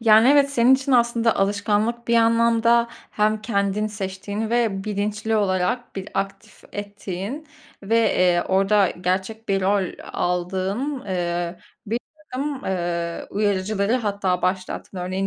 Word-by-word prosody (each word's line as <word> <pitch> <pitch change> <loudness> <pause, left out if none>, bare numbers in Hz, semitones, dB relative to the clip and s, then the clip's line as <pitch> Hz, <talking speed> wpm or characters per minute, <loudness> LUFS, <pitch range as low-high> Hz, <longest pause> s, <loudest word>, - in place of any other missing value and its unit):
Yani 225 +1 +6
evet, 280 0 +5
senin 250 -1 +5
için 270 +1 -1
aslında 235 -2 +3
alışkanlık 210 +4 0
bir 235 - +3
anlamda 230 +1 +4 0.2
hem 215 0 +1
kendin 200 -1 0
seçtiğin 205 +1 -4
ve 225 -5 +1
bilinçli 215 +1 -1
olarak 200 +4 0
bir 195 +1 -5
aktif 195 0 -4
ettiğin 205 - -6 0.4
ve, 220 +4 +1
eee, 180 -6 +3
orada 195 0 +3
gerçek 190 +5 -3
bir 195 -1 +2
rol 195 +1 +2 0.3
aldığın, 190 +10 -2
eee, 175 -1 -2 0.3
birtakım, 275 +4 -5
eee, 170 -2 -2
uyarıcıları 200 0 0
hatta 200 -6 -1
başlattın. 185 +1 -2
Örneğin 185 +2 -2
205 Hz, 120 wpm, -23 LUFS, 190-230 Hz, 0.4 s, Yani